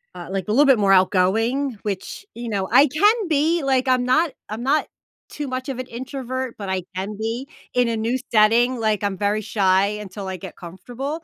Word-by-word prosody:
uh, -, -, -8 dB
like, 195 Hz, -1 st, -3 dB
a -, -, -1 dB
little 280 Hz, +7 st, +5 dB
bit 265 Hz, -5 st, +5 dB
more 195 Hz, -1 st, +3 dB
outgoing, 215 Hz, +8 st, +2 dB
which, 205 Hz, -, -5 dB
you 235 Hz, 0 st, -6 dB
know, 195 Hz, -3 st, -1 dB
I 285 Hz, -, +7 dB
can 410 Hz, -, +2 dB
be 315 Hz, +1 st, +1 dB
like, 265 Hz, -1 st, +1 dB
I'm 255 Hz, -1 st, +3 dB
not 310 Hz, +5 st, +2 dB, 0.2 s
I'm 220 Hz, +3 st, -5 dB
not 290 Hz, +4 st, +1 dB, 0.4 s
too 295 Hz, -1 st, -5 dB
much 255 Hz, +1 st, -4 dB
of 260 Hz, -2 st, -4 dB
an 255 Hz, -, -5 dB
introvert, 260 Hz, 0 st, -5 dB
but 200 Hz, -2 st, -6 dB
I 190 Hz, -1 st, -1 dB
can 195 Hz, +3 st, -4 dB
be 230 Hz, +5 st, -3 dB, 0.3 s
in 250 Hz, -1 st, +2 dB
a 230 Hz, -, -1 dB
new 230 Hz, +4 st, 0 dB
setting, 230 Hz, +3 st, +4 dB
like, 215 Hz, -2 st, 0 dB
I'm 195 Hz, -2 st, -1 dB
very 210 Hz, +1 st, 0 dB
shy 195 Hz, -2 st, +2 dB
until 205 Hz, -1 st, -6 dB
I 190 Hz, -, -4 dB
get -, -, -9 dB
comfortable, 250 Hz, -, -6 dB
235 Hz, 210 wpm, -22 LUFS, 205-270 Hz, 0.4 s, I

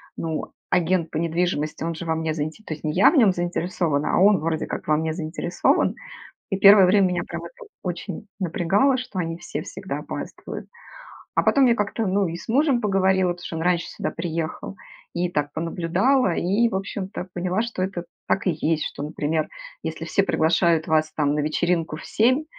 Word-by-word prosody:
ну 160 Hz, -2 st, -4 dB, 0.2 s
агент 175 Hz, -1 st, +1 dB
по -, -, -3 dB
недвижимости, 165 Hz, -2 st, -1 dB
он 165 Hz, 0 st, -2 dB
же 165 Hz, -, -6 dB
во 160 Hz, -1 st, 0 dB
мне 160 Hz, -1 st, -1 dB
заинте 155 Hz, +6 st, -4 dB
то 160 Hz, -, -5 dB
есть, 155 Hz, -, -11 dB
не 155 Hz, -, 0 dB
я 190 Hz, -, +6 dB
в -, -, -1 dB
нем 220 Hz, -7 st, +6 dB
заинтересована, 175 Hz, -4 st, -1 dB
а -, -, +3 dB
он 200 Hz, 0 st, +6 dB
вроде 160 Hz, 0 st, -1 dB
как -, -, -6 dB
во 155 Hz, -, +4 dB
мне 160 Hz, 0 st, -1 dB
заинтересован. 170 Hz, +2 st, 0 dB, 0.6 s
И 195 Hz, -, +1 dB
1 200 Hz, 0 st, +8 dB
время 195 Hz, 0 st, +4 dB
меня 180 Hz, -1 st, -1 dB
прям -, -, -6 dB
это 485 Hz, -3 st, -12 dB
очень 180 Hz, +2 st, -5 dB
напрягало, 195 Hz, -, +2 dB
что 250 Hz, -6 st, -6 dB
они 165 Hz, -1 st, -2 dB
все -, -, -5 dB
всегда -, -, -6 dB
опаздывают. -, -, -7 dB, 0.7 s
А -, -, +3 dB
потом 275 Hz, -2 st, +4 dB
я 235 Hz, -, +4 dB
как-то 215 Hz, +1 st, -1 dB
ну 195 Hz, 0 st, +2 dB
и 165 Hz, +1 st, -4 dB
с -, -, -11 dB
мужем 270 Hz, +1 st, +3 dB
поговорила, 190 Hz, -3 st, +2 dB
потому 175 Hz, -, -12 dB
что -, -, -5 dB
он -, -, -3 dB
раньше 175 Hz, 0 st, +1 dB
сюда -, -, -3 dB
приехал, 165 Hz, +2 st, -4 dB, 0.4 s
и 175 Hz, +1 st, 0 dB
так 145 Hz, -4 st, -1 dB
понаблюдала, 175 Hz, -, +1 dB
и 205 Hz, +7 st, +2 dB
в 220 Hz, -, -4 dB
общем-то 190 Hz, -1 st, -4 dB
поняла, 180 Hz, +3 st, 0 dB
что 235 Hz, -5 st, -2 dB
это 185 Hz, -2 st, -4 dB, 0.2 s
так 195 Hz, -, +1 dB
и -, -, +4 dB
есть, 160 Hz, 0 st, 0 dB
что, -, -, -5 dB
например, 155 Hz, +1 st, -1 dB, 0.3 s
если -, -, -4 dB
все 200 Hz, -, +2 dB
приглашают 165 Hz, -1 st, +2 dB
вас 155 Hz, -1 st, +2 dB
там 145 Hz, -2 st, +1 dB
на -, -, 0 dB
вечеринку 160 Hz, +1 st, 0 dB
в -, -, -10 dB
7, 255 Hz, +7 st, +2 dB
175 Hz, 195 wpm, -24 LUFS, 160-195 Hz, 0.7 s, 1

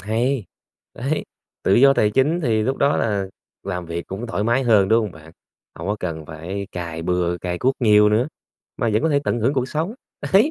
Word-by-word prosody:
hay. 115 Hz, +4 st, 0 dB, 0.5 s
Đấy, 135 Hz, +6 st, -2 dB, 0.4 s
tự 95 Hz, -, +3 dB
do 135 Hz, +2 st, +7 dB
tài 105 Hz, -, +3 dB
chính 145 Hz, +9 st, +2 dB
thì 110 Hz, -8 st, +1 dB
lúc 135 Hz, +4 st, 0 dB
đó 140 Hz, +1 st, +2 dB
là 100 Hz, -3 st, 0 dB, 0.4 s
làm 90 Hz, -3 st, -4 dB
việc 85 Hz, +1 st, -5 dB
cũng 100 Hz, +6 st, -5 dB
thoải 105 Hz, -3 st, -2 dB
mái 120 Hz, +4 st, +2 dB
hơn, 105 Hz, -5 st, +4 dB
đúng 115 Hz, +2 st, +5 dB
hông 105 Hz, -5 st, -4 dB
bạn? 80 Hz, +1 st, -14 dB, 0.4 s
Hổng 85 Hz, +4 st, -6 dB
có 105 Hz, -, 0 dB
cần 80 Hz, -3 st, -4 dB
phải 90 Hz, +6 st, -6 dB
cày 85 Hz, -2 st, -5 dB
bừa, 90 Hz, 0 st, 0 dB
cày 90 Hz, 0 st, -3 dB
cuốc 130 Hz, +1 st, +2 dB
nhiều 105 Hz, -2 st, +6 dB
nữa, 115 Hz, +7 st, +2 dB, 0.5 s
mà 115 Hz, -, 0 dB
vẫn 110 Hz, -, +2 dB
có 160 Hz, -, +2 dB
thể 145 Hz, -2 st, +3 dB
tận 120 Hz, -, 0 dB
hưởng 120 Hz, +5 st, +2 dB
cuộc 130 Hz, -1 st, 0 dB
sống. 165 Hz, +9 st, -2 dB, 0.4 s
Đấy, 215 Hz, +11 st, +5 dB
105 Hz, 215 wpm, -22 LUFS, 90-130 Hz, 0.5 s, do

